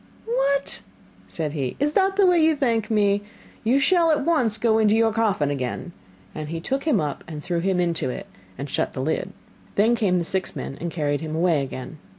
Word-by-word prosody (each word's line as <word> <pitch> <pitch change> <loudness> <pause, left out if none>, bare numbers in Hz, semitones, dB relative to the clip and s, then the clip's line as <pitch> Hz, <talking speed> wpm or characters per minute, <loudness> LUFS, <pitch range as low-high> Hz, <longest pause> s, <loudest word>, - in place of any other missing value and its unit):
'What!' 280 - +1 0.5
said 155 -3 -3
he, 135 -5 -2
'is 295 +1 +1
that 390 +1 +2
the 400 -1 +5
way 350 -3 +4
you 320 0 +4
thank 230 -6 0
me? 205 -2 +2 0.4
You 235 +4 +3
shall 335 +4 +3
at 295 -3 +2
once 255 -11 +2
go 220 0 +2
into 215 -1 +4
your 225 -1 +3
coffin 205 -10 +1
again,' 135 +5 -4 0.4
and 155 -1 -6
he 165 +1 -3
took 270 - -2
him 290 -10 +3
up, 150 -3 -3 0.2
threw 170 +2 -1
him 185 +1 0
into 170 -6 0
it, - - -5 0.3
and 140 - -5
shut - - -1
the 130 - -3
lid. 160 +5 -1 0.4
Then 220 +4 +4
came 195 -6 +1
the 170 - -1
six 190 +2 -1
men 135 - -5
and 170 - -2
carried 145 -3 -1
him 155 -1 -4
away 165 -3 +2
again. 130 +2 -7
205 Hz, 205 wpm, -24 LUFS, -, 0.5 s, the